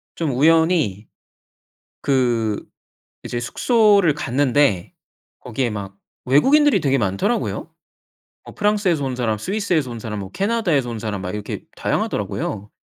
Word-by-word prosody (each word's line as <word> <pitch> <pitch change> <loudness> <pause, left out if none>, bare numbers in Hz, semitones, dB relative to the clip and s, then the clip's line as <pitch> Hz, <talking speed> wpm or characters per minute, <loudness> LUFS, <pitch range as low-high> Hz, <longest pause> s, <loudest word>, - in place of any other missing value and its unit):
좀 160 -4 -1
우연히 155 - +2 0.9
그 120 -6 0 0.6
이제 120 - -3
숙소를 205 - +3
갔는데 135 -8 +1 0.5
거기에 125 +1 -2
막 100 -2 -6 0.3
외국인들이 255 - +4
되게 135 -1 +2
많더라고요. 100 - -1 0.7
어 - - -12
프랑스에서 205 -7 +1
온 130 -2 -3
사람 110 -4 -1
스위스에서 180 - -1
온 115 - -6
사람 105 -2 -5
뭐 95 -1 -7
캐나다에서 190 - 0
온 115 - -5
사람 105 -3 -4
막 90 0 -4
이렇게 105 -1 -5
다양하더라고요. 105 0 -2
130 Hz, 310 characters per minute, -21 LUFS, 110-175 Hz, 0.9 s, 외국인들이